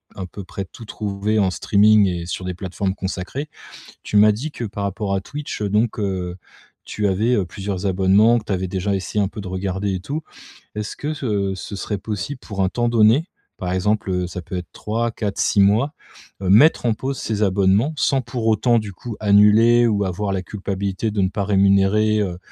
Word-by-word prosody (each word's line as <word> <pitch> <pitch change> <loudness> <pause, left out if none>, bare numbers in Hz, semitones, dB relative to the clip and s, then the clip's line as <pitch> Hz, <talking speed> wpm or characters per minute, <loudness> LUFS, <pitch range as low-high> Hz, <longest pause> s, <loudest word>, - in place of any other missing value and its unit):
un 95 - -5
peu 100 +3 -9
près 95 - -5
tout 115 +5 -13
trouver 105 0 -2
en 95 -3 +2
streaming 105 +1 +4
et 85 -2 -3
sur 90 +1 -5
des 90 - -3
plateformes 95 +1 -3
consacrées. 95 +10 -5 0.5
Tu - - -2
m'as 105 +1 +6
dit 130 +10 -4
que 120 - -5
par 100 -2 -4
rapport 100 0 -2
à 95 - 0
Twitch, 145 0 -6
heu, 100 - -1
donc 110 +3 +1
heu, 95 -3 -2 0.5
tu 105 -1 -1
avais, 110 +6 +1
heu, 95 - 0
plusieurs 95 +1 -4
abonnements 100 +5 +4
que 110 - -8
tu 110 - -3
avais 95 0 -1
déjà 95 +2 -1
essayé 95 +2 -1
un - - -1
peu 105 - -8
de 95 - -7
regarder 95 +1 -2
et 90 - -3
tout. 140 - -4 0.5
Est-ce 105 0 -4
que 150 +2 -3
ce 105 -9 -1
ce 95 - -7
serait 105 +1 -3
possible, 105 +6 -5
pour 100 -3 -4
un 95 - +2
temps 120 +4 0
donné, 115 - +4 0.3
par 90 -2 -3
exemple, 105 +2 0
heu, 90 -1 0
ça 90 0 -6
peut 90 +3 -6
être 90 - -5
3-4-6 110 -2 -1
mois, 110 +10 +3 0.5
heu, 95 - -1
mettre 135 +11 +6
en 115 - +3
pause 135 +4 -4
ces 110 -1 -2
abonnements? 100 +8 +2
Sans 135 -1 +2
pour 120 -1 -4
autant, 115 +2 +3
du 105 -2 -5
coup, 110 +4 -8
annuler 110 +3 +5
ou 105 -3 +1
avoir 100 +2 -2
la 95 -1 -1
culpabilité 100 +2 -3
de 105 -2 0
ne 95 - +2
pas 100 +1 -3
rémunérer, 100 +2 +3
heu 90 -4 -2
100 Hz, 210 wpm, -21 LUFS, 95-110 Hz, 0.5 s, m'as